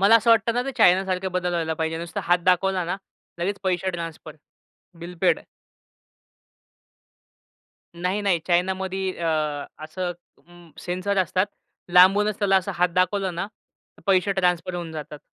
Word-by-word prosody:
मला 205 +4 +7
असं 230 +1 +2
वाटतं 230 0 +4
ना, 245 - +1
ते 270 +2 -4
चायनासारखे 190 +1 +3
बदल 180 -1 0
व्हायला 165 -2 -1
पाहिजे, 160 0 -2
नुसता 170 0 -5
हात 175 +1 +3
दाखवला 185 0 +2
ना 175 +3 -2 0.4
लगेच 195 +3 -1
पैसे 185 0 0
ट्रान्सफर, 165 -3 -7 0.7
बिल 180 +1 -8
पेड. - - +3 2.5
नाही, 180 +4 -1
नाही. 195 -4 +2
चायनामध्ये 190 +1 0
अ 170 -1 -1 0.6
असं 175 +3 -4 0.3
अं, 175 -1 -17
सेन्सर 185 +3 -2
असतात, 185 +1 +1 0.5
लांबूनच 195 +3 +5
त्याला 195 -2 +3
असा 190 +1 0
हात 180 +1 +2
दाखवलं 185 0 +1
ना, 175 +3 -3 0.5
तर - - -18
पैसे 195 +1 +3
ट्रान्सफर 180 -2 0
होऊन 170 -2 -5
जातात. 150 -1 -7
185 Hz, 145 wpm, -24 LUFS, 175-195 Hz, 2.5 s, मला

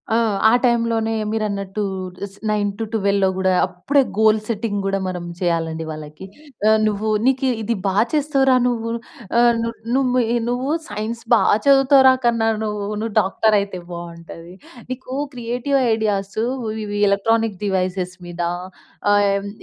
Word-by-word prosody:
ఆ! - - +4 0.3
ఆ - - +4
టైంలోనే 230 -2 +1 0.2
మీరన్నట్టూ 205 -2 -2 0.4
ఇస్ 195 0 -13 0.2
9-12లో 205 -1 0
గూడా 190 -1 +2
అప్పుడే 270 +11 +1 0.2
గోల్ 220 0 +5
సెట్టింగ్ 215 -2 -2
గూడా 195 0 0
మనం 180 -1 -4
వ్హెయ్యాలండి 165 -2 -1
వాళ్ళకి. 155 +3 -8 0.4
ఆహ్, 220 0 +5
నువ్వూ 215 +1 -1 0.2
నీకీ 265 0 +2
ఇది 230 +2 -1
బా 190 - 0 0.2
చేస్తావురా 275 -3 +3
నువ్వు. 230 -2 -2 0.5
ఆహ్, 240 0 +6
ను 230 - -1 0.3
నుము 255 -2 +2
ఇ - - +2
నువ్వు 255 +4 -1 0.2
సైన్స్ 215 +3 -4
బా 230 - +5 0.2
చదువుతావురా 270 -1 +6
కన్నా! 230 -1 +2 0.2
నువ్వు 210 -1 -3 0.2
నువ్వు 225 -2 -3
డాక్టరయితే 200 -1 +1
బావుంటది. 170 0 -9 0.4
నీకు 255 0 -7 0.2
క్రియేటివ్ 245 +3 -1 0.2
ఐడియాసు 210 -1 -1 0.2
వ్ 220 - -3 0.2
ఇవి 205 0 -3
ఎలక్ట్రానిక్ 225 0 +1
డివైసెస్ 185 -1 -1
మీద, 175 0 -6 0.7
ఆహ్ 200 0 +2
215 Hz, 130 wpm, -20 LUFS, 195-235 Hz, 0.7 s, ఆహ్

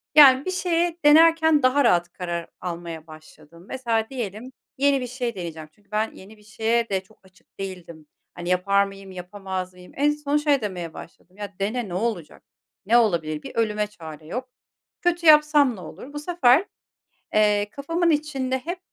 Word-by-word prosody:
yani, 275 -3 +8
bir 370 - -1
şeye 345 -2 0
denerken 320 -1 +6
daha 265 +3 +4
rahat 175 -5 +2
karar 170 -2 -4
almaya 170 -2 -6
başladım. 155 +1 -15
Mesela 230 -4 -1
diyelim, 240 -1 -6 0.3
yeni 280 0 +3
bir 250 - -4
şey 245 -2 -4
deneyeceğim 160 -4 -7
çünkü 205 +4 -32
ben, 215 +1 0
yeni 205 +3 -14
bir 210 - -21
şeye 230 +2 0
de 190 -2 0
çok 215 +3 -24
açık 190 +1 -26
değildim. 175 -5 -8 0.3
Hani, 175 0 -6
yapar 200 +2 +3
mıyım, 195 -1 -9
yapamaz 185 0 -6
mıyım? 180 0 -15
En 290 +2 +3
son 295 0 -1
şey 295 -3 +2
demeye 180 -6 -5
başladım, 180 +3 -13
"Ya, 205 -1 -7
dene 220 +4 -2
ne - - -6
olacak? 190 -4 -3 0.4
Ne 230 +4 +5
olabilir? 165 -9 +1
Bir - - -9
ölüme 210 -2 0
çare 160 -7 -11
yok. 250 +10 -5 0.5
Kötü 350 -1 0
yapsam 300 -4 +6
ne - - -11
olur?" 275 +9 -10
Bu 295 - -4
sefer, 300 -1 +3 0.7
eee, 210 -1 +3
kafamın 330 +5 0
içinde 285 -4 0
hep, 345 +7 -5
215 Hz, 170 wpm, -24 LUFS, 180-280 Hz, 0.7 s, yani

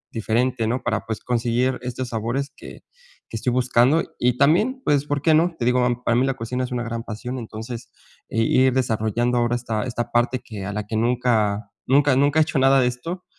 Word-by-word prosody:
diferente, 115 +1 0
¿no? 125 +3 -2
Para, 110 -3 -1
pues, 110 - -4
conseguir 125 +1 0
estos 125 0 -4
sabores 120 +5 -2
que - - -12 0.5
que 115 - -5
estoy 125 - -1
buscando. 125 +5 +3 0.2
Y 125 0 +2
también, 215 - +3
pues, 145 -1 +2
¿por 145 -1 -2
qué 160 - +4
no? 165 +2 +3
Te 120 - -2
digo, 125 +1 +3 0.2
para 115 - +2
mí 125 - +3
la 135 -1 -1
cocina 125 +1 -3
es 125 - -5
una 120 -1 -2
gran 115 0 -4
pasión, 125 +3 -6
entonces, 115 +1 -7 0.4
eh, 115 - 0
ir 130 +2 +3
desarrollando 120 0 0
ahora 120 0 +1
esta 115 -3 -2
esta 120 -1 -4
parte 120 +2 +2
que 105 -5 -8
a 105 - -4
la 105 0 -3
que 110 - -4
nunca 110 -4 +1 0.2
nunca 140 +1 +4
nunca 145 +3 +2
he - - +6
hecho 145 -3 -1
nada 135 +1 +5
de 125 - +2
esto. 165 +10 -5
125 Hz, 210 wpm, -22 LUFS, 115-130 Hz, 0.5 s, he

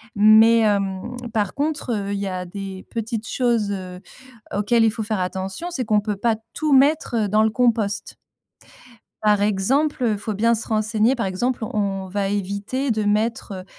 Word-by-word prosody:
mais 220 +2 +6
hem, 200 +1 0 0.2
par 210 -4 0
contre, 290 -3 -2
heu, 200 -1 -2
il 200 - -2
y 200 - -2
a 185 -1 -3
des 190 0 -7
petites 225 -1 -3
choses, 235 -5 0
heu, 185 -2 -6 0.5
auxquelles 210 +3 +2
il 225 - +4
faut 220 -1 -4
faire 215 -1 -2
attention, 190 - -3
c'est 255 -8 -2
qu'on 210 -1 +2
peut 210 -1 -3
pas 230 +1 +1 0.2
tout 305 -2 0
mettre, 280 0 +3
heu, 215 -3 +1
dans 215 +2 +3
le 220 - +3
compost. 215 -4 +1 1.2
Par 210 -1 +3
exemple, 255 +9 +1
heu, 220 -3 +2
faut 215 +2 -4
bien 230 +3 +2
se 220 - -3
renseigner. 215 +2 +1
Par 230 -6 -2
exemple, 230 +6 -1
on 195 -3 -2
va 195 +1 -1
éviter 205 +7 -2
de 215 -2 0
mettre, 215 +1 0
heu, 185 -1 -7
215 Hz, 185 wpm, -22 LUFS, 200-235 Hz, 1.2 s, mais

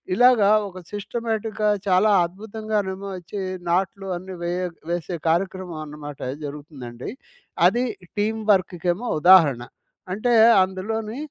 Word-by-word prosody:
ఇలాగా 245 -4 +5 0.2
ఒక 185 - -13 0.2
సిస్టమాటిక్‌గా 220 0 -2 0.2
చాలా 190 +4 +4
అద్భుతంగానేమో 200 0 -4
అచ్చి 195 +3 -6 0.3
నాట్లు 195 +2 0
అన్ని 185 +1 -8
వే 170 - -1 0.4
వేసే 175 0 -3
కార్యక్రమం 180 -1 -1
అన్నమాట 145 -1 -9 0.3
జరుగుతుందండి. 140 - -8 0.6
అది 245 +2 +1 0.3
టీమ్ 220 +2 0
వర్క్‌కేమో 180 +3 -1
ఉదాహరణ. 155 -9 +6 0.5
అంటే 215 +6 0 0.3
అందులోని 215 +5 -3
190 Hz, 100 wpm, -23 LUFS, 175-215 Hz, 0.6 s, ఉదాహరణ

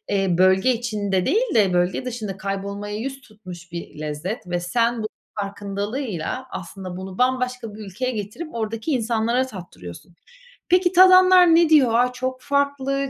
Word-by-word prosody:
eee, 195 -1 +1
bölge 190 +6 +4
içinde 205 -5 -2
değil 450 0 +1
de 200 -4 +4
bölge 180 +7 0
dışında 220 -6 -5
kaybolmaya 200 +1 -4
yüz 270 +3 -5
tutmuş 185 -7 -13
bir 170 -3 -8
lezzet 155 +8 -5
ve 175 0 -2
sen 230 +5 0
bu - - -2 0.3
farkındalığıyla 205 - -4
aslında 185 0 -7
bunu 190 0 -8
bambaşka 250 -3 -1
bir - - -11
ülkeye 250 +7 -3
getirip 225 - -6
oradaki 225 +4 -3
insanlara 235 +1 0
tattırıyorsun. 175 - -11 0.6
Peki, 360 0 +4
tadanlar 370 -2 +7
ne 335 -1 +4
diyor? 265 -7 +5
"A! 250 +2 +3
Çok 255 0 -4
farklı." 280 -1 0
225 Hz, 145 wpm, -22 LUFS, 195-260 Hz, 0.6 s, tadanlar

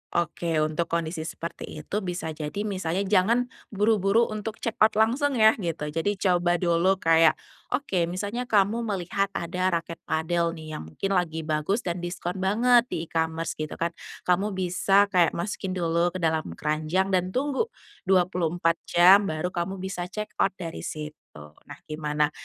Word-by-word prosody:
Oke, 170 0 -1
untuk 155 +2 -1
kondisi 160 -1 -2
seperti 170 +1 -6 0.2
itu, 210 - -2
bisa 180 -4 -4
jadi 155 +6 -4
misalnya 190 -3 -1
jangan 215 +5 +2 0.2
buru-buru 210 +1 +3
untuk 215 +1 -4
checkout 220 -2 +1
langsung 255 +6 +2
ya 220 -1 +7
gitu. 165 -4 -3
Jadi 165 +7 0
coba 175 -2 +2
dulu 175 +2 +2
kayak, 165 -2 +4 0.4
oke 190 -11 -1
misalnya 205 +8 -3
kamu 220 +3 +2
melihat 195 0 -1
ada 180 +2 -1
raket 170 -2 -2
padel 170 +1 0
nih 155 -1 -9
yang 80 - -9
mungkin 195 - -3
lagi 165 -4 0
bagus 155 +8 -1
dan 175 0 -2
diskon 175 +1 -4
banget 235 +5 +4
di 160 - -3
e-commerce 160 0 -2
gitu 155 - -4
kan. 170 0 -1 0.3
Kamu 190 +3 +1
bisa 195 +2 +2
kayak 175 -3 +3
masukin 190 +1 -3
dulu 170 -1 +1
ke 185 - -4
dalam 160 -1 0
keranjang 155 +5 0
dan 185 -1 +2
tunggu 285 - 0 0.4
24 175 -2 +2
jam 190 +4 +6
baru 155 +2 -2
kamu 175 +2 -3
bisa 185 -2 -4
checkout 200 -1 -2
dari 165 -4 -6
situ. 150 -1 -5 0.6
Nah, - - -9
gimana 150 -1 -1
180 Hz, 155 wpm, -26 LUFS, 165-200 Hz, 0.6 s, ya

